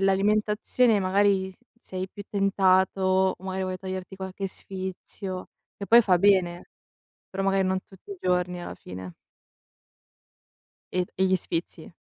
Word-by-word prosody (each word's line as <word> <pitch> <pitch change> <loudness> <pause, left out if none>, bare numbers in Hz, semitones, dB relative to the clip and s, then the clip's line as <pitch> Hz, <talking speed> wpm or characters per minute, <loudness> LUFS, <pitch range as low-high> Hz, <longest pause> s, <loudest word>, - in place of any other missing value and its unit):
l'alimentazione 210 +3 +2
magari 190 0 +2 0.3
sei 185 -3 -5
più 205 - -9
tentato, 190 -1 +3
magari 190 0 -3
vuoi 185 0 -3
toglierti 190 0 -6
qualche 190 +1 -5
sfizio, 190 0 -6 0.3
che 200 - -6
poi 235 +1 +9
fa 185 -5 +3
bene, 180 -3 +3 0.6
però 195 +1 -3
magari 195 -1 +2
non 190 0 0
tutti 195 - -17
i 390 - -10
giorni 180 -1 0
alla - - -6
fine. 90 -1 -9 1.8
E 180 0 +1
e 190 - +4
gli 185 0 +3
sfizi. 170 -1 -5
190 Hz, 130 wpm, -26 LUFS, 185-195 Hz, 1.8 s, poi